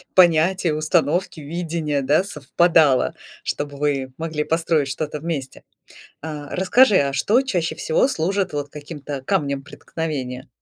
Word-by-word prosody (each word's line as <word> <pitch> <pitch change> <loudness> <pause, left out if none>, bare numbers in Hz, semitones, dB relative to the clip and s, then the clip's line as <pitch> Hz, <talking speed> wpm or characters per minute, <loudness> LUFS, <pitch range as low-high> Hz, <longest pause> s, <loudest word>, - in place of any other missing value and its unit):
понятия, 175 0 +4
установки, 155 +3 0
видения, 160 -1 -2
да, 145 +6 +3
совпадало, 160 -4 +2 0.3
чтобы 145 -1 -4
вы 140 -3 -1
могли 160 -2 -2
построить 165 -3 +1
что-то 150 +2 -4
вместе. 150 -4 -5 0.6
А 150 -2 -6
расскажи, 205 +4 +5
а 140 -1 0
что 210 - +2
чаще 175 -10 -1
всего 160 +11 +1
служит 190 -2 -1
вот 145 -1 -3
каким-то 145 -2 -7
камнем 140 -4 -1
преткновения? 140 -4 -5
155 Hz, 125 wpm, -22 LUFS, 145-175 Hz, 0.6 s, расскажи